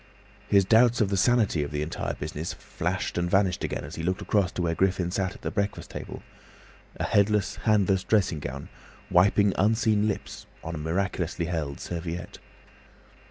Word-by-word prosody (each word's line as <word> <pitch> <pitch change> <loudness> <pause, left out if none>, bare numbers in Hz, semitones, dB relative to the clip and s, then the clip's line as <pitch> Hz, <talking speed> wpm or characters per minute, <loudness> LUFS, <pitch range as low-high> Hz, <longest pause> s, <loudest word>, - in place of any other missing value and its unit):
His 100 -1 +4
doubts 120 +3 +5
of 105 -4 +2
the 100 - 0
sanity 105 -5 +3
of 70 - -2
the 75 +1 -2
entire 80 - -3
business 75 +2 -5
flashed - - -3
and 85 0 0
vanished 95 -1 +2
again - - -3
as 70 +3 -8
he - - -3
looked 90 +3 -1
across 100 -5 +1
to 90 - -2
where 85 -1 +1
Griffin 90 0 +1
sat 95 0 -1
at - - -15
the - - -2
breakfast 100 -1 -2
table—a - - -11
headless, 100 -1 +2
handless 95 -3 +3
dressing 95 -7 +1
gown, 70 0 -6 0.4
wiping 100 +2 +4
unseen 110 0 +3
lips 105 - -5 0.2
on 80 - -5
a 80 - -4
miraculously 85 +1 -1
held 80 -5 -3
serviette. 85 0 -5
95 Hz, 165 wpm, -27 LUFS, 85-100 Hz, 0.4 s, doubts